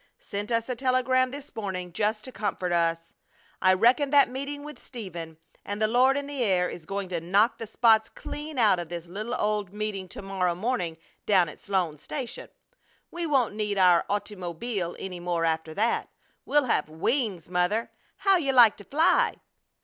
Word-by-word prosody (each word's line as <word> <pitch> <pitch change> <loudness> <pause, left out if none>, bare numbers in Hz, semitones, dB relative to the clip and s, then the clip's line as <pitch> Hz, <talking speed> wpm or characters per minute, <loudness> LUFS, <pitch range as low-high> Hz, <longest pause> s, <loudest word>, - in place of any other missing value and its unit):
Sent 205 +1 -5
us 230 -1 0
a 250 - -2
telegram 255 0 +2
this 280 +2 -9
morning, 185 -5 -4
just 215 +1 0
to 260 - -8
comfort 195 -4 -2
us! 165 -1 0 0.5
I 185 0 +5
reckon 245 +8 +4
that 280 -2 +5
meeting 280 +2 -5
with 300 0 -9
Stephen 170 -9 -8 0.3
and 205 +1 -5
the 215 - +3
Lord 255 +4 +4
in 285 - -2
the 280 -2 -4
air 185 -4 +2
is 160 -2 -9
going 195 -1 -3
to 175 -2 -2
knock 200 +7 +2
the 225 - -5
spots 220 0 +4
clean 300 0 -7
out 210 -6 +4
of 170 -2 -6
this 170 -1 -6
little 215 +7 -4
old 210 -4 -1
meeting 205 -2 -4
to 190 - -9
morrow 185 -3 0
morning 180 -5 -2 0.3
down 185 -5 +4
at - - -12
Sloan's 175 -7 -1
Station. 255 -5 -6 0.6
We 340 -1 -3
won't 265 -8 +2
need 210 -1 -2
our 180 -2 +5
ottymobeel 190 -1 -3
any 185 -2 -6
more 175 -1 -1
after 160 0 -1
that. 225 +3 0 0.4
We'll 295 -2 +3
have 155 -10 0
wings, 190 - -1
Mother! 180 +6 0 0.3
How'll 390 -2 +3
you 275 -4 0
like 240 -4 +7
to 205 - -11
fly?" 325 - +3
210 Hz, 180 wpm, -27 LUFS, 180-250 Hz, 0.6 s, like